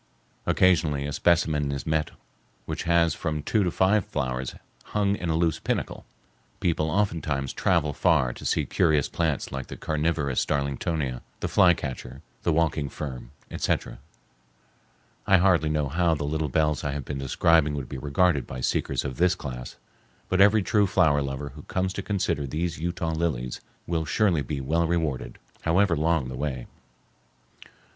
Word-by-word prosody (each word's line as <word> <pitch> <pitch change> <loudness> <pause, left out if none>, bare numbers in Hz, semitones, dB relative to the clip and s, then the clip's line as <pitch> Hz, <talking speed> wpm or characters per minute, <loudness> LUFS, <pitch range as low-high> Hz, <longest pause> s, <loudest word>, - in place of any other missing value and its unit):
Occasionally 80 -6 +3
a 75 - -4
specimen 75 -3 +2
is 70 -2 -4
met 80 -1 0 0.6
which - - -4
has 85 -1 +3
from 75 0 -3
two 105 +4 +1
to 90 - +1
five 95 +4 +3
flowers 65 -3 -3 0.3
hung 100 -1 +1
in 90 -4 -4
a 80 - +1
loose 80 -1 +1
panicle. - - -3 0.5
People 80 -2 0
oftentimes 80 -8 -1
travel 80 -5 +1
far 75 -7 +2
to - - -11
see - - +1
curious 75 -3 +2
plants 80 -5 -1
like 65 -1 -5
the - - -8
carnivorous 75 -3 0
darlingtonia, 70 -1 -2 0.2
the - - -2
fly 90 -2 +5
catcher, 65 -2 -7 0.2
the - - +1
walking 80 -3 +1
fern, 65 -3 -6 0.2
etc. - - -2 1.3
I 95 - +6
hardly 90 -4 +3
know 75 -2 0
how 85 +3 +2
the 75 - -4
little 75 +1 -1
bells 75 +1 +1
I 75 -2 -1
have 70 -2 -5
been 70 -2 -4
describing 75 +2 +3
would 70 -4 -4
be 65 - -6
regarded 70 +1 +1
by 65 - -6
seekers - - 0
of 65 -3 -4
this 90 0 +3
class, 60 -7 -7 0.5
but 95 +1 +3
every 105 +1 +6
true 105 0 +3
flower 75 -5 +3
lover 70 +1 -4
who 75 +3 -11
comes 95 +4 -2
to 100 - -4
consider 95 -8 -1
these 80 +4 -3
Utah 85 0 -2
lilies 80 -7 -2 0.2
will 80 -2 -1
surely 85 +1 +2
be 70 +1 -4
well 80 +5 +1
rewarded, 80 -8 -2 0.2
however 90 +2 +3
long 80 -3 +1
the 65 - -6
way. 65 -2 -3
80 Hz, 165 wpm, -26 LUFS, 70-85 Hz, 1.3 s, I